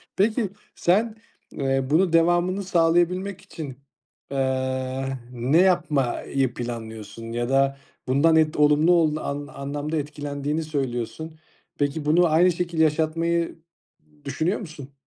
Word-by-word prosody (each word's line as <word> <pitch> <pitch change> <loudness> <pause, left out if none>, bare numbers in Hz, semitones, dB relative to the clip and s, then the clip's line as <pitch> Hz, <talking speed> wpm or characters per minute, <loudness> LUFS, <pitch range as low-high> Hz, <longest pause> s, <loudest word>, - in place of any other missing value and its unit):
Peki, 215 +1 +1 0.3
sen, 215 +5 +2 0.4
eee, 135 -1 0
bunun 165 +3 +3
devamını 175 +3 +3
sağlayabilmek 180 +2 +1
için, 140 -6 -8 0.5
eee, 130 -1 -1 0.3
ne 125 +5 +1
yapmayı 140 -7 +1
planlıyorsun 115 -2 -7
ya 120 +1 -2
da 135 0 +2 0.3
bundan 145 +5 +4
ed 155 -1 +3
olumlu 150 +3 +4
ol 160 -3 +3
an 145 -2 -3
an 145 0 -6
anlamda 145 +2 -4
etkilendiğini 145 +1 -3
söylüyorsun. 145 +1 -4 0.4
Peki, 145 +1 -1
bunu 165 +4 +4
aynı 170 +3 +4
şekilde 170 -1 0
yaşatmayı 165 +2 0 0.7
düşünüyor 160 +8 -1
musun? 155 - -10
150 Hz, 115 wpm, -24 LUFS, 135-170 Hz, 0.7 s, bundan